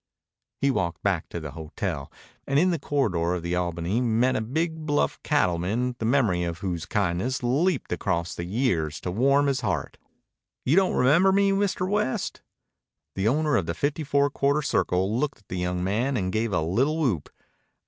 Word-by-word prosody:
He 140 0 +3
walked 85 -8 -2
back 95 -5 0
to 85 - -5
the 75 -3 -7
hotel, 75 -3 -5 0.4
and 140 - +1
in 180 +5 +4
the 170 - -1
corridor 90 - 0
of 85 - -5
the 85 +1 -2
Albany 90 +5 -1
met 120 +2 +2
a - - 0
big 160 +6 -2
bluff 145 -1 0
cattleman 115 - 0
the 115 - -2
memory 115 -8 +2
of 85 -1 -2
whose 85 -3 -4
kindness 100 +6 -1
leaped 145 +6 +1
across 85 -3 -1
the 85 - -5
years 85 - 0
to 90 - -3
warm 140 +8 +3
his 135 -2 0
heart. 95 - -2 0.7
"You 135 - +3
don't 190 -1 +3
remember 165 +10 +4
me, 200 0 +3
Mr. 195 -2 0
West?" 205 -9 -1 0.7
The 95 +2 0
owner 150 +4 +2
of 95 -8 +1
the 85 - -2
Fifty 145 - -1
Four 140 0 +2
Quarter 140 +2 +1
Circle 95 -2 +1
looked 145 -1 -1
at 105 - -28
the 90 - -4
young 90 0 -1
man 120 +8 0
and 95 -3 -2
gave 110 0 0
a 90 -4 +1
little 130 - +1
whoop. 120 - 0
115 Hz, 185 wpm, -26 LUFS, 90-145 Hz, 0.7 s, in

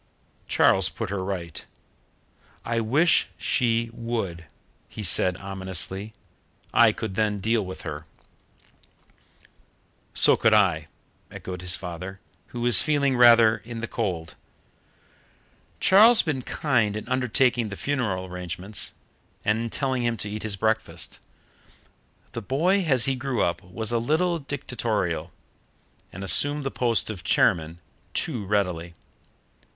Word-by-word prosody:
Charles - - +3
put - - -6
her 100 -2 -3
right. 90 -4 -5 1.0
"I 115 0 -1
wish 140 +10 +2
she 115 -1 0
would," 110 -8 -4 0.4
he 110 - -8
said 90 0 +2
ominously. 95 +1 -2 0.6
"I - - +6
could 110 -4 -6
then 105 0 -1
deal 110 +2 0
with 95 0 -9
her." 75 -1 -7 2.1
"So - - +6
could 110 -1 +3
I," 90 -7 +2 0.4
echoed 90 -1 -8
his 90 0 +2
father, 90 +2 -7 0.3
who 120 - -7
was 120 -5 +4
feeling 140 -3 +1
rather 115 -2 +6
in 115 +1 -9
the 115 - -4
cold. 90 -9 -4 1.5
Charles 220 +4 +6
had - - -12
been 145 -5 -2
kind 120 -7 0
in 105 - -8
undertaking 125 -2 +1
the 100 - -6
funeral 110 -9 -2
arrangements 90 +2 -3 0.5
and 105 +2 +1
in 115 0 -3
telling 130 0 -1
him 120 -1 -1
to 105 - -6
eat 105 0 -5
his 105 -2 -1
breakfast, 110 +2 -1 1.0
but - - -35
the 115 - -5
boy 170 - +1
as 130 -6 +3
he 135 - +1
grew 130 -1 -2
up 85 - -1
was 105 +5 -5
a 120 - +1
little 165 +8 0
dictatorial, 110 - -3 0.8
and 95 - -8
assumed 145 - +6
the 135 - -3
post 115 -3 0
of 95 -5 -9
chairman 80 -1 +1 0.4
too 125 -10 +1
readily. 90 -5 -2
110 Hz, 135 wpm, -24 LUFS, 95-125 Hz, 2.1 s, I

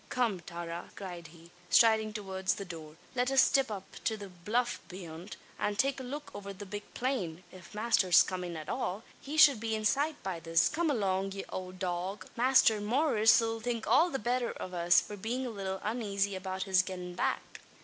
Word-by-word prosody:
"Come, 235 -7 0
Tara!" 170 0 -7
cried 175 -4 -7
he, 165 +1 -16 0.2
striding 220 -2 +5
towards 190 -3 -2
the 200 - -6
door. 160 -4 -9 0.2
"Let 250 0 +1
us 270 -1 +6
stip 270 -3 +3
up 200 -3 -5 0.2
to 220 - +1
the 200 -2 -8
bluff 210 +8 -1
beyant, 175 0 -8 0.2
and 205 0 -1
take 270 +3 +1
a - - -6
look 290 +4 -6
over 200 -1 -7
the 200 +2 -9
big 205 +2 -7
plain. 190 -10 -2
If 185 +1 -13
masther's 210 -5 +5
comin' 180 -2 -4
at 155 -1 -8
all, 220 -4 -2 0.2
he 295 +3 -5
shud 280 -6 +8
be 225 0 -1
in 215 0 -3
sight 290 +7 +1
by 190 -3 -3
this. 165 +1 +2
Come 335 0 0
along, 195 -6 0
ye 195 - -6
owld 185 0 -6
dog! 185 +2 -3
Masther 235 -3 +4
Maurice 225 -1 +4
'll 225 0 -1
think 235 -1 -3
all 345 - +5
the 270 - -2
betther 245 +1 -1
av 185 - -6
us, 175 0 +5
for 210 - -7
bein' 235 +6 -3
a 245 - -3
little 195 -2 -4
unazy 200 -3 -1
about 190 0 -3
his 190 -2 +4
gettin' 180 -1 -6
back." - - -2
205 Hz, 200 wpm, -31 LUFS, 185-235 Hz, 0.2 s, shud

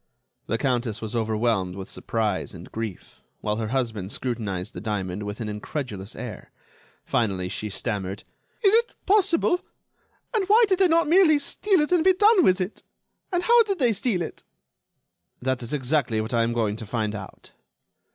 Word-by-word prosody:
The 115 - 0
Countess 120 -4 -1
was 110 +1 -5
overwhelmed 110 -4 0
with 95 0 -7
surprise 105 -5 -2
and 85 0 -11
grief, 110 -5 -6 0.2
while 105 0 -1
her 110 -1 -2
husband 110 -6 -2
scrutinized 105 -8 -3
the 90 - -7
diamond 100 -3 -3
with 105 0 -5
an 110 - -3
incredulous 105 -1 -5
air. 115 -4 -7 0.6
Finally 95 -5 0
she 105 +3 -4
stammered: 100 -2 -3 0.4
"Is 395 0 +5
it 470 +2 +3
possible? 370 -3 +3 0.7
And 415 -5 +1
why 450 +3 +7
did 380 -2 +1
they 380 - +6
not 335 -1 +3
merely 330 -2 +6
steal 365 +5 +1
it 300 - -1
and 350 -3 +4
be 375 +1 +6
done 410 0 +5
with 185 -5 +4
it? 185 +3 -4 0.5
And 355 -1 0
how 475 +3 +6
did 400 -4 0
they 245 -7 +3
steal 195 -3 0
it?" - - -8 1.0
"That 130 0 -1
is 120 - -4
exactly 135 -5 0
what 110 +3 -3
I 115 - +3
am 115 +1 +1
going 110 -3 0
to 110 - -8
find 110 -1 -1
out." 95 -3 -9
120 Hz, 175 wpm, -25 LUFS, -, 1.0 s, why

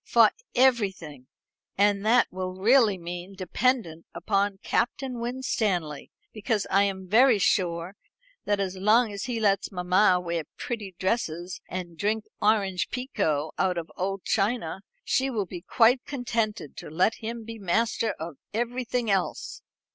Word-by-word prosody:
"For - - +5 0.2
everything. 195 - +1 0.5
And 200 0 +3
that 240 +2 +5
will 185 0 -4
really 215 +1 +4
mean 175 +2 -7
dependent 190 -3 -1
upon 200 -1 0
Captain 250 +1 -1
Winstanley; 215 - -2 0.2
because 215 -1 -1
I 200 +1 +5
am 190 -1 -4
very 235 +4 +5
sure 180 -2 0 0.5
that 205 -1 +1
as 190 -1 -2
long 215 +3 +3
as 200 - -4
he 240 -2 -2
lets 200 -2 +1
mamma 180 +1 +3
wear 170 -3 -3
pretty 210 -6 -5
dresses 185 -3 -2
and 175 -3 -6
drink 215 +1 0 0.2
orange 200 -4 +2
pekoe 160 - -1
out 185 -2 +1
of 170 0 -5
old 195 +1 -3
china, 200 -4 0 0.2
she 270 +1 +1
will 215 -6 -1
be 175 -1 -8
quite 245 +6 +3
contented 230 - -2
to - - -8
let 180 +8 +2
him 230 0 -6
be 225 0 -8
master 220 +3 0
of 160 -2 -6 0.2
everything 240 -1 -1
else." 190 -2 -2
200 Hz, 140 wpm, -26 LUFS, 180-230 Hz, 0.5 s, For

